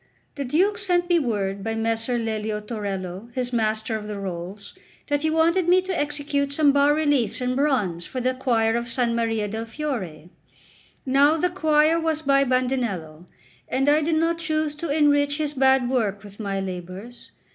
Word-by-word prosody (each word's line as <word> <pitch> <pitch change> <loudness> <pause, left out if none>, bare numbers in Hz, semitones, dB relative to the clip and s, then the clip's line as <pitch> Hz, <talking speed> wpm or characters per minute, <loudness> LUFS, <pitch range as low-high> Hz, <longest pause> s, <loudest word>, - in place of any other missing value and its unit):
XCVIII - - -39
THE 280 - -3
DUKE 370 +11 +2
sent 355 -3 +1
me 345 -1 +4
word 200 -7 -2
by 225 +1 -2
Messer 225 +2 0
Lelio 220 -2 -2
Torello, 200 -2 -5
his 250 -1 -2
Master 220 0 0
of 210 -1 -5
the 210 -1 -5
Rolls, 190 +1 -6 0.4
that 290 0 +1
he 315 - +1
wanted 330 +3 +2
me 365 +1 +6
to 375 -1 -3
execute 290 -2 -1
some 290 -1 +4
bas 285 +1 +4
reliefs 290 -8 +1
in 250 0 -1
bronze 245 - 0
for 255 - -5
the 255 +1 0
choir 230 -4 +1
of 235 0 -1
S. 235 +1 -3
Maria 230 -3 0
del 220 +2 -4
Fiore. 205 - -5 0.7
Now 280 +4 +4
the 360 +3 0
choir 315 -2 +3
was 320 -1 -1
by 275 -1 +4
Bandinello, 240 - -2 0.4
and 270 +2 0
I 295 +2 +4
did 320 +1 +1
not 330 +1 +1
choose 310 -2 -1
to 335 +1 -4
enrich 290 -1 +3
his 300 -2 -2
bad 265 -2 +3
work 215 -6 -1
with 205 0 -13
my 200 -2 -2
labours. 190 +5 -7
255 Hz, 180 wpm, -24 LUFS, 215-300 Hz, 0.7 s, me